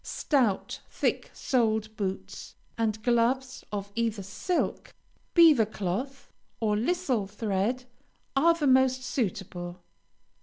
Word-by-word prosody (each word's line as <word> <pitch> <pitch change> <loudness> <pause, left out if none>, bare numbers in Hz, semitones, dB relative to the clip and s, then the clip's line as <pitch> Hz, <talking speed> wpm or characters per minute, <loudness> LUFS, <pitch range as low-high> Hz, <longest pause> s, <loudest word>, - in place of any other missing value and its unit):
Stout, 250 -10 0
thick - - -1
soled 220 -4 0
boots, 195 -2 -5 0.2
and 220 -1 -1
gloves 255 +2 +1
of 200 -1 -4
either 225 -3 -1
silk, 205 - -2 0.4
beaver 310 - +7
cloth, 220 +7 -4 0.3
or 215 -2 +1
lisle 255 - 0
thread, 210 +4 -1 0.5
are 335 +5 +5
the 315 -3 -1
most 260 -1 +4
suitable. 180 -7 -3
230 Hz, 105 wpm, -28 LUFS, 205-260 Hz, 0.5 s, beaver